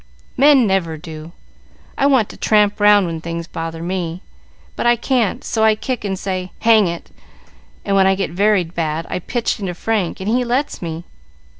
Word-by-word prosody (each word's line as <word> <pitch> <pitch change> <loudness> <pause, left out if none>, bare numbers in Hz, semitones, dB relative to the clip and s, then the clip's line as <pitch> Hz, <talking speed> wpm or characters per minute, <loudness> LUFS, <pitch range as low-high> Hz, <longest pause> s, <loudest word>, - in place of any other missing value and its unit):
"Men 275 -2 +5
never 185 -5 0
do. 155 0 -9 0.6
I 280 - +2
want 260 -7 +3
to - - -10
tramp 210 -1 +2
round 205 -1 +5
when 165 -2 -4
things 170 0 -5
bother 165 0 -6
me; 175 0 -4 0.5
but - - -1
I 240 - +5
can't, 235 -3 0
so 220 - -1
I 220 -1 +5
kick 250 +2 -4
and 195 -2 -2
say, 185 -1 -4
'Hang 220 -4 +5
it!' 170 0 -6 0.7
and 200 - +1
when 190 -1 +5
I 190 - +3
get 195 -5 -2
very 200 +1 +2
bad 165 -1 -3
I - - -1
pitch 235 +6 -2
into 185 -4 -4
Frank, 210 -3 -2
and 190 - -5
he 245 +3 +2
lets 250 +4 -1
me. 165 -1 -5
195 Hz, 185 wpm, -19 LUFS, 170-220 Hz, 0.7 s, Men